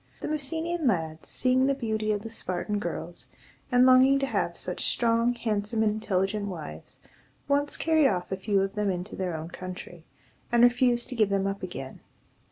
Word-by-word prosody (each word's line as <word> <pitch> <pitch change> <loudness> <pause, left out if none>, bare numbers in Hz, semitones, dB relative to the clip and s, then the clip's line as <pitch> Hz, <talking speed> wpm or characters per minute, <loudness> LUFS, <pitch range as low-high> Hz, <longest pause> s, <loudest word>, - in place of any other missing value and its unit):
The - - -3
Messenian 320 +2 -2
lads, 160 -7 -1
seeing 255 +1 +2
the 275 - +2
beauty 220 -4 -1
of 205 -1 -2
the 225 - -6
Spartan 205 0 -3
girls, - - -5 0.4
and 245 0 +6
longing 260 +1 +6
to 275 - 0
have - - -1
such - - -3
strong, 235 +1 +2
handsome, 220 -1 -1
and 215 - +3
intelligent 205 -1 -1
wives, 155 - -8 0.5
once 285 0 +1
carried 315 -3 +3
off 180 -5 -2
a - - +1
few 195 0 +1
of 195 0 -3
them 210 -1 0
into 185 +2 -4
their 180 -3 -2
own 160 +1 -7
country, 180 -2 -8 0.5
and 240 0 +5
refused 245 0 +3
to 255 - -5
give 215 -3 +3
them 195 -1 +1
up 195 0 -2
again. 175 -8 -7
215 Hz, 180 wpm, -27 LUFS, 190-255 Hz, 0.5 s, and